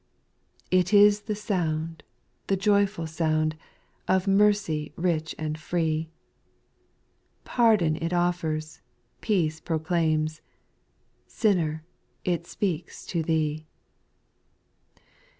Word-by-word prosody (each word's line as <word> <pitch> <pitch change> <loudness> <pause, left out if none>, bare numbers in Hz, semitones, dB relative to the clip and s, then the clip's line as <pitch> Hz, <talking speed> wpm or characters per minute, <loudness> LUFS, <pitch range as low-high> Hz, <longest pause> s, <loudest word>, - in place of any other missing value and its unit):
Chobus. 185 - -5
It 180 +3 -1
is 205 0 +6
the 210 - 0
sound, 165 -6 -2 0.5
the 195 - +1
joyful 200 -2 +2
sound, 155 -1 0 0.5
Of 190 +1 +2
mercy 195 -6 +2
rich 165 -2 -1
and 155 0 -4
free; 160 -1 -1 1.3
Pardon 215 -10 +3
it 165 +1 -1
offers, 170 -3 -1 0.4
peace 165 -8 0
proclaims, 155 -1 0 0.9
Sinner 165 -8 0 0.4
I - - 0
it 170 0 -2
speaks 175 -4 -3
to 170 - -2
thee. 155 -1 -1
165 Hz, 95 wpm, -26 LUFS, 155-195 Hz, 1.3 s, is